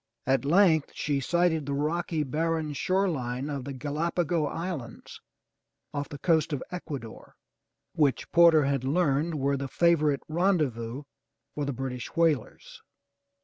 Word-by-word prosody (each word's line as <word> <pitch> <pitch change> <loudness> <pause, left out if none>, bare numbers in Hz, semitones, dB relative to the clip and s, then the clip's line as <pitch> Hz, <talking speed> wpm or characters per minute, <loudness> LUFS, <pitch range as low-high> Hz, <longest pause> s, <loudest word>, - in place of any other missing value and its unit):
At 135 +1 +1
length 165 -1 +4
she 145 -2 -1
sighted 160 0 +1
the 140 - -1
rocky, 160 +2 -1
barren 155 +2 -1
shore 190 +7 +1
line 130 -3 -3
of 140 -3 -4
the 140 - -5
Ga 135 +2 -5
la'pa 170 +4 0
go 160 -2 0
Islands 155 -8 -6 0.7
off 145 -1 -3
the 145 - -7
coast 160 +1 +2
of 145 -3 -2
Ecuador, 145 -10 -7 0.6
which 145 -4 +1
Porter 170 -3 +6
had 135 -2 0
learned 155 +2 +1
were 140 -1 0
the 135 0 -4
favorite 155 -1 +2
rendezvous 150 - 0 0.5
for 145 - -3
the 140 - -2
British 125 -1 -5
whalers. 170 - -1
150 Hz, 145 wpm, -28 LUFS, 140-170 Hz, 0.7 s, Porter